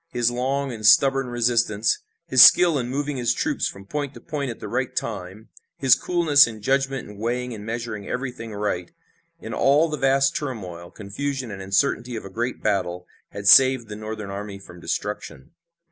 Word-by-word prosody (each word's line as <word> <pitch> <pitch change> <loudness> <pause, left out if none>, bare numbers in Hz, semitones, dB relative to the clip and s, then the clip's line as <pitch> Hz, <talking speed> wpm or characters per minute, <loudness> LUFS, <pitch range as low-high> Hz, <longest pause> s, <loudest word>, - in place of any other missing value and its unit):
His 120 -5 0
long 135 +3 -2
and 110 -2 -9
stubborn 135 +5 +5
resistance, 120 -3 +1 0.3
his 130 -6 +5
skill 170 -5 +7
in 120 -1 -4
moving 140 +1 -3
his 120 -2 0
troops - - -1
from 100 0 -9
point 145 +5 -4
to - - -10
point 145 -3 -4
at 115 - -7
the - - -7
right 125 +4 -3
time, 105 0 -5 0.3
his 135 -3 +5
coolness 160 -6 +4
and 110 -2 -8
judgment 135 0 0
in 105 -1 -12
weighing 125 +2 -2
and 105 -2 -8
measuring 115 -2 -5
everything 125 -3 -5
right, 100 -4 -3 0.5
in - - -7
all 145 +4 +3
the 150 - -3
vast 135 0 +2
turmoil, 90 - -6
confusion 125 +6 -5
and 100 -1 -7
uncertainty 120 +5 0
of 110 - -6
a 95 - -9
great 120 +5 -4
battle, 90 -4 -1 0.2
had 100 0 -6
saved 130 -2 +6
the 105 - -6
Northern 110 -1 -7
army 100 0 -6
from 90 -3 -14
destruction. 85 -11 -5
120 Hz, 180 wpm, -23 LUFS, 105-135 Hz, 0.5 s, skill